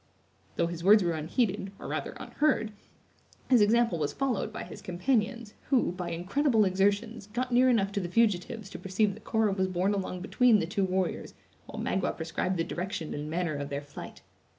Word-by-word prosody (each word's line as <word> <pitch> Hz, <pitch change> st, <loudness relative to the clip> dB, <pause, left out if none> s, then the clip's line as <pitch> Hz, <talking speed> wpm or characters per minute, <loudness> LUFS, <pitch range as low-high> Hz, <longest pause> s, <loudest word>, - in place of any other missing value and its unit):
Though 170 Hz, -, +2 dB
his 170 Hz, 0 st, -5 dB
words 205 Hz, +2 st, +7 dB
were 170 Hz, -, +1 dB
unheeded, 190 Hz, -, -1 dB
or -, -, -8 dB
rather -, -, -3 dB
unheard, 265 Hz, -8 st, 0 dB, 0.8 s
his 245 Hz, -4 st, +7 dB
example 225 Hz, -3 st, +3 dB
was 145 Hz, -1 st, -1 dB
followed 265 Hz, -6 st, -1 dB
by -, -, -6 dB
his -, -, -10 dB
companions, 220 Hz, +3 st, -1 dB, 0.2 s
who, 260 Hz, -9 st, +3 dB
by 180 Hz, -1 st, -5 dB
incredible 215 Hz, -, +2 dB
exertions, 205 Hz, +3 st, 0 dB
got 245 Hz, +4 st, -3 dB
near 250 Hz, +2 st, +5 dB
enough 200 Hz, -5 st, +2 dB
to 200 Hz, -, -1 dB
the 175 Hz, -3 st, -4 dB
fugitives 215 Hz, +1 st, +1 dB
to -, -, -7 dB
perceive 195 Hz, +2 st, +1 dB
that 215 Hz, +2 st, -14 dB
Cora 220 Hz, -2 st, +2 dB
was 190 Hz, -1 st, 0 dB
borne 185 Hz, +2 st, 0 dB
along 185 Hz, -2 st, -3 dB
between 235 Hz, +4 st, +4 dB
the 190 Hz, -, 0 dB
two 190 Hz, +3 st, 0 dB
warriors 185 Hz, 0 st, -2 dB, 0.3 s
while -, -, -7 dB
Magua 190 Hz, 0 st, -1 dB
prescribed 170 Hz, +3 st, -2 dB
the 165 Hz, -, +1 dB
direction 175 Hz, -2 st, -4 dB
and 150 Hz, +1 st, -5 dB
manner 170 Hz, 0 st, -1 dB
of 140 Hz, -1 st, -4 dB
their 140 Hz, -, -2 dB
flight. 145 Hz, -, -10 dB
195 Hz, 190 wpm, -29 LUFS, 175-225 Hz, 0.8 s, words